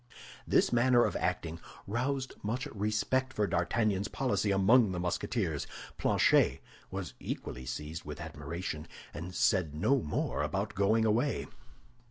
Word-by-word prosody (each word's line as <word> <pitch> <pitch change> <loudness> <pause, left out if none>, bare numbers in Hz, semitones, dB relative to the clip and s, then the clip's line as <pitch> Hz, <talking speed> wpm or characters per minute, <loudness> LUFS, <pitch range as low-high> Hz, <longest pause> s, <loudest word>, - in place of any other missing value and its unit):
This - - +3
manner 120 0 +5
of - - -1
acting 85 0 -2 0.3
roused 130 +5 -1
much 115 +5 -2
respect 110 +5 0
for 105 - +1
D'Artagnan's 100 +3 +1
policy 125 -3 0
among 100 +2 +5
the 90 - -2
Musketeers. 90 - -1 0.3
Planchet - - +4 0.3
was 95 -3 -5
equally 65 -1 -5
seized 75 +5 -5
with 75 -1 -7
admiration, 75 +1 -5 0.3
and 85 +4 -6
said 90 -9 +2
no 135 - +3
more 75 - -1
about - - -1
going 110 +3 +3
away. 120 +6 +1
100 Hz, 130 wpm, -31 LUFS, 85-120 Hz, 0.3 s, manner